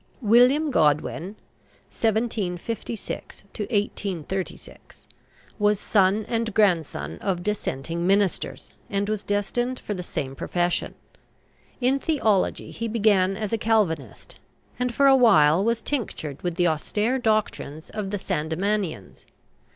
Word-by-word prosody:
WILLIAM 250 +7 +4
GODWIN 160 - +1 0.6
(1756 220 -1 -3
1836) 195 -3 -4 0.5
was 210 -1 +3
son 205 +1 +2
and 230 -3 -2
grandson 180 -8 +1
of 185 -3 -1
Dissenting 170 -4 -2
ministers, 195 -1 0 0.2
and 200 0 -1
was 215 -1 -2
destined 240 +5 -1
for 210 - -4
the 185 - -4
same 135 -6 -4
profession. 175 +4 -1 0.8
In 265 +2 +2
theology 225 - 0
he 230 - -4
began 200 -4 +2
as 215 -1 -3
a 225 - +1
Calvinist, 180 - -1 0.4
and 250 0 0
for 280 +4 +2
a 270 -1 +7
while 190 - +5
was 230 +1 0
tinctured 170 - -4
with 175 -2 -2
the 175 0 +2
austere 210 - 0
doctrines 215 - -1
of 210 -2 -4
the 205 - -2
Sandemanians. 175 - -2
205 Hz, 115 wpm, -25 LUFS, 175-225 Hz, 0.8 s, a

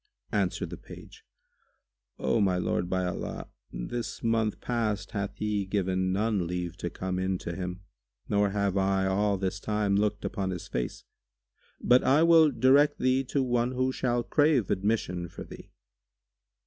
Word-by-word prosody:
Answered 100 -4 -1
the - - -6
page, - - -13 0.9
"O 65 +10 +1
my 95 -2 +2
lord, 90 0 -1
by 95 0 0
Allah, 90 - -5 0.2
this 110 - -5
month 115 -2 +1
past 110 -5 -2
hath 100 0 -3
he 105 -1 -1
given 95 -2 0
none 100 -2 0
leave 90 -1 -3
to 90 - -3
come 90 +1 -3
in 95 0 0
to 85 -1 -6
him, 90 +1 -5 0.5
nor 100 0 +2
have 100 -1 0
I 95 0 +2
all 100 +1 +1
this 95 0 -2
time 105 -1 0
looked 105 +1 0
upon 95 -2 -2
his 90 -2 -5
face; 60 -1 -4 0.8
but 125 +1 +4
I 145 +5 +4
will 165 -2 +7
direct 140 +3 +4
thee 130 +1 +2
to 135 +1 0
one 120 0 0
who 130 +1 +1
shall 120 -2 0
crave 145 - +2
admission 95 -3 -1
for - - -8
thee. - - -12
100 Hz, 160 wpm, -28 LUFS, 95-120 Hz, 0.9 s, will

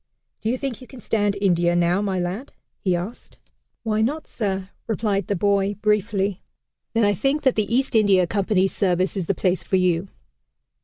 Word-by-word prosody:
"Do 220 - -1
you 250 - 0
think 260 -4 -4
you 255 - -11
can 260 - -12
stand 205 -3 0
India, 175 -3 +2
now, 175 +2 +2
my 195 -2 -1
lad?" 185 +10 -4 0.3
he 185 -2 +1
asked. 185 +8 -6 0.5
"Why 215 -1 0
not, 290 +7 -1
sir?" 195 -3 -3 0.2
replied 205 -4 0
the 200 - 0
boy 200 +1 +1
briefly. 205 -2 0 0.5
"Then 225 - +3
I 205 - +3
think 275 - 0
that 260 -2 +4
the 215 0 0
East 265 +3 +1
India 200 -5 +4
Company's 195 0 +1
service 185 0 +1
is 185 -4 -2
the 195 - +1
place 185 +1 +1
for - - -1
you." 180 0 +2
200 Hz, 185 wpm, -23 LUFS, 185-220 Hz, 0.5 s, that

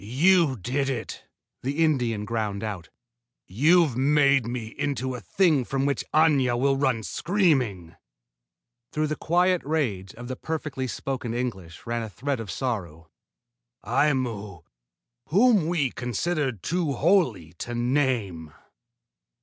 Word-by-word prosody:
"You 155 - +3
did 135 +7 -1
it!" 120 -5 -5 0.4
the 140 +5 0
Indian 120 -8 0
ground 105 -2 -2
out. 100 -6 -5 0.6
"You've 150 - +3
made 140 -2 +3
me 120 -2 -4
into 130 -1 -3
a 125 - -5
thing 165 -9 +2
from 135 +2 -1
which 140 -1 0
Aña 140 -6 +3
will 135 +1 +2
run 130 -5 0
screaming." 130 - 0 1.0
Through 155 0 0
the 155 0 -2
quiet 180 +3 +2
rage 120 -12 -2
of 120 +1 -9
the 130 - -4
perfectly 150 -3 -4
spoken 125 -2 -4
English 95 -10 -5
ran 120 0 -2
a 110 - -5
thread 135 +5 -3
of 110 -3 -6
sorrow. 85 - -4 0.7
"Aimu, 115 - 0 0.6
whom 205 -1 +4
we 155 -7 0
considered 130 - -2
too 170 -4 0
holy 135 - +1
to 120 - -4
name!" 120 - -1
130 Hz, 125 wpm, -25 LUFS, 110-150 Hz, 1.0 s, whom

